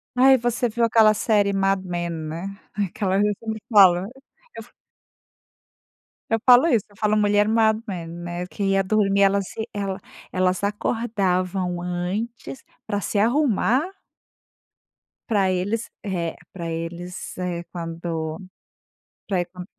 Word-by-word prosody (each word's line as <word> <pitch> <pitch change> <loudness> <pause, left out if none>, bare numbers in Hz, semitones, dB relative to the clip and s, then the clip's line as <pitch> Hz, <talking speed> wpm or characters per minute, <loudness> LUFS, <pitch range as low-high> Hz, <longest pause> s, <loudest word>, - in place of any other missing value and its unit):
Ai, 265 +1 +6
você 240 0 0
viu 235 +1 -1
aquela 220 -2 +5
série 205 -2 +2
Mad 195 0 +1
Men, 175 -1 -3
né. 160 +2 -5 0.3
Aquela 195 -1 -1
ali 205 +1 +3
eu - - 0
sempre 220 -1 -5
falo 190 -4 +8 0.6
eu - - -6
f - - -21 1.6
eu 225 - +2
falo 250 +5 +7
isso, 230 - +2
eu 205 - -21
falo: 215 0 +2
"Mulher 205 0 +3
Mad 220 -1 +3
Men," 175 -4 -5 0.2
né, 175 +1 -4
que 200 - -5
ia 195 0 +2
dormir 200 0 +2
ela 200 0 +4
se 220 +3 -6
ela 195 -2 -3 0.3
elas 185 +1 0
acordavam 190 -4 -1
antes 195 +9 -4 0.2
pra 205 -2 -2
se 200 - -2
arrumar 250 +2 +2 1.5
pra 200 -4 +2
eles, 205 +5 -2
eh, 175 -5 -2 0.2
pra 170 -3 -6
eles, 170 +3 -6
eh, 175 -2 -3
quando 165 -2 -4 0.9
pra 185 -3 +1
e - - -3
qua 180 0 -10
195 Hz, 140 wpm, -23 LUFS, 180-220 Hz, 1.6 s, falo